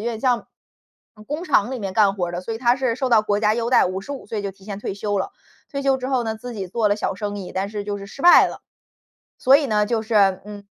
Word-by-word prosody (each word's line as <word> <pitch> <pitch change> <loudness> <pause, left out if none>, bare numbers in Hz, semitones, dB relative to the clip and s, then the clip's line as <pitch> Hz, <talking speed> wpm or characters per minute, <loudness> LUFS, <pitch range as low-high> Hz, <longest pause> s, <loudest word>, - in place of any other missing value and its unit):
点 225 0 -3
像 245 -2 +1 0.8
工 300 +5 -4
厂 255 - +2
里 260 - -4
面 195 -4 -5
干 205 -2 +4
活 180 -3 -2
儿 175 - -6
的， 175 +1 -4
所 225 - -5
以 225 - -5
他 240 0 +3
是 260 -3 0
受 260 +2 -2
到 230 -3 +5
国 205 -1 0
家 215 0 +3
优 235 +1 -2
待， - - +5
55 195 +10 -6
岁 215 -2 -4
就 200 - -3
提 195 0 -20
前 200 -2 -5
退 205 - -4
休 205 0 -2
了。 190 - -3 0.4
退 280 - -3
休 275 -1 +2
之 260 0 -5
后 260 -2 +1
呢， 220 -1 -3
自 245 +3 -8
己 200 -4 -5
做 215 +3 +1
了 205 - +2
小 205 - -2
生 205 +1 -4
意， 190 - -7
但 195 +2 -2
是 210 -1 -5
就 205 0 -3
是 200 0 -8
失 235 - -12
败 350 +3 +8
了。 - - -7 0.8
所 265 +2 +6
以 290 - 0
呢， 210 -3 +2
就 225 0 -1
是， 200 -4 +3
嗯， 205 -1 -10
215 Hz, 290 characters per minute, -22 LUFS, 200-245 Hz, 0.8 s, 败